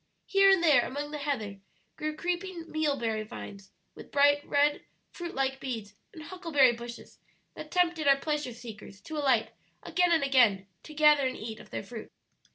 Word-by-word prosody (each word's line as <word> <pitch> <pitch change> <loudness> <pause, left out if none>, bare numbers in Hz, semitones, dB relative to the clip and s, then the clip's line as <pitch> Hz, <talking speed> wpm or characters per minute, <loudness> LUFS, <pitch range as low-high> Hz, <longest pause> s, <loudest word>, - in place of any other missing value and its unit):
Here 390 0 +5
and 385 -3 +4
there 295 -7 +6
among 290 +4 -5
the 300 - -5
heather 220 -9 -3 0.4
grew 305 0 -4
creeping 350 +1 -3
mealberry 275 -8 -1
vines, 205 -3 -9 0.2
with - - -13
bright 285 0 +4
red 290 +1 +2 0.3
fruit 345 -1 -7
like 270 0 -1
beads, 225 -7 -5 0.2
and 315 - -11
huckleberry 320 -7 +2
bushes 235 0 -10 0.3
that - - -9
tempted 345 -4 +1
our 275 0 +6
pleasure 295 -2 -2
seekers 220 -4 -11
to 315 -1 -7
alight 265 -6 +2 0.3
again 360 -1 +1
and 325 -3 +3
again 235 -8 +3 0.2
to 305 - -12
gather 300 -2 +5
and 255 - -4
eat 220 0 -7
of - - -14
their - - -5
fruit. 220 +2 -9
285 Hz, 170 wpm, -29 LUFS, 235-310 Hz, 0.4 s, there